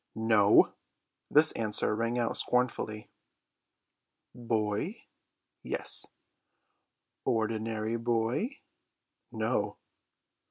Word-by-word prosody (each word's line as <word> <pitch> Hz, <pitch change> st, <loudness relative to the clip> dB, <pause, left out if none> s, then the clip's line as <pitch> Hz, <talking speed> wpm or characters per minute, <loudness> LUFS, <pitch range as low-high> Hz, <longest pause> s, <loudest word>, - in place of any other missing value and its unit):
"No!" 110 Hz, -2 st, +5 dB, 0.6 s
This 155 Hz, +2 st, +5 dB
answer 105 Hz, -1 st, 0 dB
rang 115 Hz, +2 st, -1 dB
out 120 Hz, -1 st, 0 dB
scornfully. 120 Hz, -3 st, -1 dB, 1.2 s
"Boy?" 110 Hz, -4 st, -2 dB, 0.6 s
"Yes." -, -, -2 dB, 1.2 s
"Ordinary 110 Hz, 0 st, -1 dB
boy?" 120 Hz, -, -1 dB, 0.7 s
"No!" -, -, -1 dB
115 Hz, 65 wpm, -30 LUFS, 110-120 Hz, 1.2 s, No